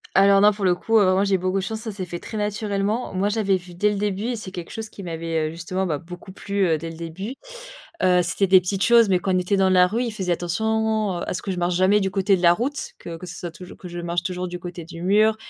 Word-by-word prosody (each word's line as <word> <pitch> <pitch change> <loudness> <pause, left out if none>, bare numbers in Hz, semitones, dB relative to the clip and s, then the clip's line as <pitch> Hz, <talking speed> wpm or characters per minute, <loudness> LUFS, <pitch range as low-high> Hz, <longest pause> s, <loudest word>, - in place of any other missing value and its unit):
Alors, 195 0 +6
non, 210 +1 +7
pour 205 -1 -3
le 180 - +4
coup, 225 +5 +1
heu, 190 -3 +4
moi, 190 +1 +2
j'ai 195 -1 +2
beaucoup 185 +1 -1
de 195 - -1
chance. 220 +2 -4
Ça 220 - -5
s'est 195 -2 -5
fait 175 0 -6
très 220 - -7
naturellement. 210 +2 -1
Moi, 190 +2 +1
j'avais 210 -2 +1
vu 180 -1 -13
dès 210 +4 +2
le 205 - -2
début 205 0 -2
et 245 - -1
c'est 210 -4 -8
quelque 175 -2 -7
chose 220 -1 -6
qui 200 - -10
m'avait, 165 -2 -2
heu, - - -7
justement, 170 +3 -3
bah 155 -5 -1
beaucoup 175 +3 -11
plu, 200 0 -1
heu, 160 -2 +2
dès 165 +2 -6
le 165 - -9
début, 175 +9 -6 0.7
heu, 180 -1 +5
c'était 175 +3 0
des 185 0 +7
petites 190 +2 -2
choses 235 -3 +5
mais 180 -1 +3
quand 185 0 0
on - - +3
était 180 +3 0
dans 190 -1 +3
la 180 -1 +5
rue, 230 +6 -1
il 235 - -2
faisait 190 -4 -2
attention, 220 +2 0
heu, - - -4
à - - -2
ce - - -4
que 195 - -4
je 180 - -4
marche 175 0 0
jamais 190 +3 +4
du 190 -1 -1
côté 195 +1 +2
de - - -6
la 170 - +7
route, 265 +10 -3
que 165 -1 -7
que 180 - -9
ce 175 - -8
soit 175 -2 -6
toujours 180 +2 -12
que 180 - -10
je 175 0 -6
marche 170 0 -2
toujours 180 -1 -3
du 175 0 -6
côté 175 -2 -7
du 170 0 -9
mur 215 +3 +4
190 Hz, 300 wpm, -23 LUFS, 175-210 Hz, 0.7 s, non